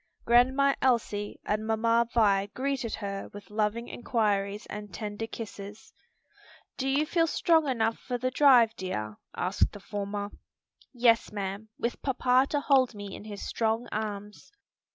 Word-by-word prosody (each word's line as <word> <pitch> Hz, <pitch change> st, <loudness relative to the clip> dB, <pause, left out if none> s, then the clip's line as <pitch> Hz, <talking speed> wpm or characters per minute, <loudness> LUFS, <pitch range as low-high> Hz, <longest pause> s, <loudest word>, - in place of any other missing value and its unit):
Grandma 260 Hz, +4 st, +4 dB
Elsie 220 Hz, -5 st, 0 dB
and 215 Hz, +1 st, -1 dB
Mamma 230 Hz, +1 st, +2 dB
Vi 200 Hz, -4 st, +3 dB
greeted 265 Hz, -3 st, -2 dB
her 200 Hz, -2 st, -5 dB
with 205 Hz, -1 st, -11 dB
loving 215 Hz, +2 st, -1 dB
inquiries 210 Hz, -4 st, -1 dB
and 210 Hz, -1 st, -8 dB
tender 210 Hz, +2 st, -5 dB
kisses. 210 Hz, -2 st, -9 dB, 0.8 s
"Do 270 Hz, 0 st, -2 dB
you 285 Hz, +3 st, +2 dB
feel 330 Hz, +1 st, +2 dB
strong 320 Hz, -2 st, +3 dB
enough 225 Hz, -3 st, 0 dB
for 250 Hz, -2 st, -3 dB
the 255 Hz, +1 st, -1 dB
drive, 250 Hz, -5 st, +6 dB
dear?" 110 Hz, -, -4 dB, 0.2 s
asked 185 Hz, +3 st, +1 dB
the 205 Hz, -, -9 dB
former. 205 Hz, 0 st, -4 dB, 0.6 s
"Yes, 235 Hz, -3 st, +3 dB
ma'am; 200 Hz, +1 st, -5 dB
with 235 Hz, -, -3 dB
papa 260 Hz, 0 st, +2 dB
to 290 Hz, -, 0 dB
hold 260 Hz, -5 st, +3 dB
me 205 Hz, -1 st, -7 dB
in -, -, -10 dB
his 205 Hz, -2 st, -7 dB
strong 225 Hz, +1 st, -1 dB
arms." 210 Hz, -1 st, -5 dB
220 Hz, 145 wpm, -28 LUFS, 205-250 Hz, 0.8 s, drive